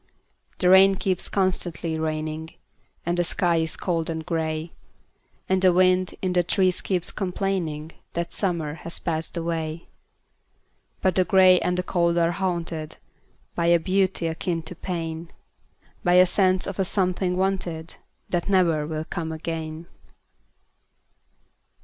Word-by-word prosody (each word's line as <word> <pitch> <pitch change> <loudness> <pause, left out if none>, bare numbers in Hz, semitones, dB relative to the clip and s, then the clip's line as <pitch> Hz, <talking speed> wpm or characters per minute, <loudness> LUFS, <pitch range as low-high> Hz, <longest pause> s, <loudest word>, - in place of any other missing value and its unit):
The 180 - +2
rain 190 +1 +7
keeps 190 -2 0
constantly 175 -4 -1
raining, 155 0 -3 0.5
And 175 +1 0
the - - +3
sky 175 0 +1
is 160 0 -1
cold 165 -3 -1
and 160 -1 -4
gray, 160 -1 -2 0.7
And 190 0 +1
the 185 -1 +6
wind 185 0 +3
in 185 -1 0
the 180 - +4
trees 185 +1 +1
keeps 180 -3 +1
complainingThat 170 -3 -3
summer 170 -7 -1
has 170 - -4
passed 165 0 -3
away;—But 165 +2 -6
the 185 - +3
gray 185 -1 +6
and 180 0 -1
the 180 - 0
cold 170 -1 +1
are 170 0 +3
hauntedBy 170 -4 -3 0.6
a 170 0 +4
beauty 190 0 0
akin 165 +1 -2
to 160 - -8
pain,—By 165 +1 -6
a 180 0 +8
sense 185 0 +2
of 195 0 -6
a - - +3
something 185 -1 0
wanted, 185 -4 -2 0.4
That 175 +2 -1
never 170 -6 +2
will 155 0 -4
come 165 -1 -4
again. 160 0 -5
175 Hz, 130 wpm, -24 LUFS, 160-185 Hz, 0.7 s, a